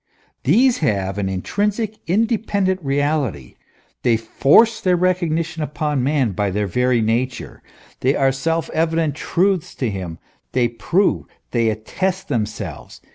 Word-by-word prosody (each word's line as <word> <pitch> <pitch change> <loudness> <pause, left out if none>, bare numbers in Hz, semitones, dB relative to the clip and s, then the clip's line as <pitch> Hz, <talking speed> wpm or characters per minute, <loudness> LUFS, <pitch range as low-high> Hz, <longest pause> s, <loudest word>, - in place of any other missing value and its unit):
These 240 - +4
have 100 - 0
an 95 -1 -1
intrinsic, 205 - -2
independent 200 -1 +1
reality; 140 - -1 0.5
they 115 -2 +3
force 150 - +4
their 185 -1 +3
recognition 170 -2 0
upon 150 -2 -1
man 135 -4 +1
by 100 +2 -1
their 105 +2 -1
very 125 +4 +1
nature; 120 +3 -2 0.4
they 135 +2 +2
are 135 -1 +3
self 165 +4 -1
evident 160 -1 +1
truths 180 +4 0
to 125 -5 -1
him; 90 -4 -5 0.4
they 120 -2 +2
prove, 175 - 0 0.2
they 115 -2 +2
attest 180 - -3
themselves. 105 - -4
145 Hz, 130 wpm, -20 LUFS, 115-180 Hz, 0.5 s, These